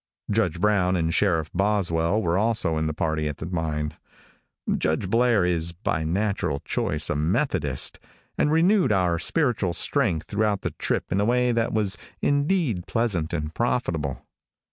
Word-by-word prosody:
Judge 95 -6 +1
Brown 95 -2 +2
and 80 -2 0
Sheriff 80 -6 +1
Boswell 95 0 +1
were 85 -1 +1
also 105 -5 +1
in 80 - 0
the - - -1
party 80 0 -1
at 75 - -4
the - - -6
mine. 80 -3 -2 0.8
Judge 80 +5 0
Blair 115 -5 +3
is, 85 -1 -1
by 80 -3 -2
natural 95 -3 -1
choice, 75 0 0
a - - 0
Methodist, 75 - 0 0.4
and 150 - +1
renewed 175 - +3
our 90 -4 +2
spiritual 120 - +1
strength 80 0 +1
throughout 105 -1 0
the - - -3
trip - - -2
in 95 +3 +1
a - - +2
way 125 +1 +2
that 115 0 0
was 105 -3 -1 0.2
indeed 145 - 0
pleasant 100 -9 -1
and 75 +1 -3
profitable. 80 - -2
95 Hz, 155 wpm, -25 LUFS, 80-110 Hz, 0.8 s, Blair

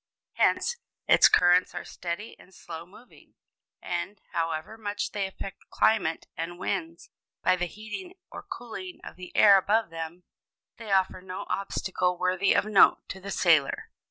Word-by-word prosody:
Hence, 480 - +2 0.3
its - - +7
currents 180 0 +4
are 175 - -5
steady 180 +5 -6
and 185 - -18
slow 165 0 -9
moving, 225 +7 -18 0.5
and, 180 +3 -4
however 165 +4 -2
much 205 -2 -3
they 200 -2 -1
affect 195 0 -9
climate 215 -7 +1
and 165 +2 -5
winds 170 -3 -4 0.3
by - - +4
the 180 -1 -2
heating 225 - -8 0.2
or - - -7
cooling 225 - -8
of - - -9
the 180 -1 -10
air 200 -2 +8
above 210 -1 +1
them, 165 +2 -6 0.5
they 225 -3 -7
offer 190 -1 +2
no 185 0 -7
obstacle 185 -2 -1
worthy 185 +2 +1
of - - +2
note 215 -2 +5
to 190 - -6
the 195 +1 -8
sailor. 165 -7 +2
185 Hz, 155 wpm, -27 LUFS, 175-205 Hz, 0.5 s, air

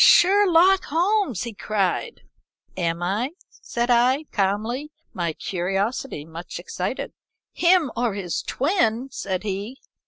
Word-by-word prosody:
"'Sherlock 375 0 +6
Holmes!' 355 - +1
he 235 -2 -5
cried. 210 - -2 0.5
"'Am 170 -1 -1
I?' 215 - -1 0.2
said 240 +1 -2
I, 250 +5 +4
calmly, 220 +9 -1 0.2
my 170 -2 -1
curiosity 195 - -2
much 165 +2 -8
excited. - - -4 0.4
"'Him 345 -6 +3
or 235 -4 0
his 185 -4 -2
twin!' 265 - 0
said 190 -1 -3
he. 205 +5 -4
235 Hz, 115 wpm, -23 LUFS, 195-310 Hz, 0.5 s, Sherlock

